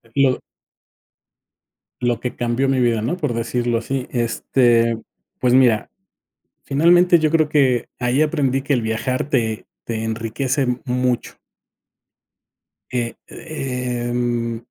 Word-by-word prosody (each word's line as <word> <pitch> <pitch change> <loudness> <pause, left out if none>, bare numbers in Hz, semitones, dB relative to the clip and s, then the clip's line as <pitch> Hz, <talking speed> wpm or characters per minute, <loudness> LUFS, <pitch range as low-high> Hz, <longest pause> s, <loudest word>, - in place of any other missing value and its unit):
Lo 135 -2 +3 1.6
lo 120 -1 0
que 125 - -4
cambió 120 +3 0
mi 135 -1 +2
vida, 120 -3 +2
¿no?, 125 +11 -1
por 150 -8 -1
decirlo 120 0 -1
así. 130 +2 -3
Este, 115 -1 +2 0.4
pues 125 -1 +2
mira, 120 -5 +4 0.7
finalmente, 175 +4 +4
yo 155 -1 +1
creo 155 -2 +3
que 130 -6 +2
ahí 125 +4 +2
aprendí 140 -4 +1
que 140 - -1
el 120 - 0
viajar 120 +5 -2
te 115 -5 0 0.2
te 110 -1 -3
enriquece 115 +4 -1 0.2
mucho. 125 -1 -1 1.5
Eh, 120 -2 -2
eh, 125 -6 -4
mm, 120 -1 -1
125 Hz, 120 wpm, -20 LUFS, 115-135 Hz, 1.6 s, mira